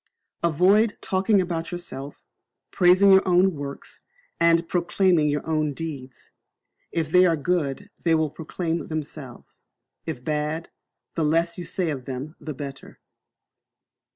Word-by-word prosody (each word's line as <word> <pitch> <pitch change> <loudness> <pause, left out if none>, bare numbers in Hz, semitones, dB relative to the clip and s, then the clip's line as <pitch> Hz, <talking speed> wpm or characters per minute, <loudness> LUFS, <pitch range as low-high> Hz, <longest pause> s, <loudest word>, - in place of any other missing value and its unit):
Avoid 190 +7 +3
talking 195 +2 +2
about 170 -2 -2
yourself, 145 -6 -7 0.4
praising 185 +2 +5
your 190 0 +7
own 185 +1 +4
works, 140 -2 -8 0.4
and 170 0 +3
proclaiming 175 -2 +2
your 145 0 -2
own 155 -2 0
deeds. 140 -6 -7 0.6
If 160 -2 -2
they 180 +1 +6
are 165 -2 +2
good 175 +4 -2
they 165 -1 +3
will 155 -2 0
proclaim 165 +1 -4
themselves, 150 -4 -8 0.4
if 140 -6 -5
bad, 150 +2 -2 0.4
the 165 - -1
less 165 +3 +1
you - - -4
say 175 -2 -1
of 130 -4 -6
them 135 +5 -6
the 155 -3 -6
better. 135 0 -9
165 Hz, 130 wpm, -24 LUFS, 150-180 Hz, 0.6 s, your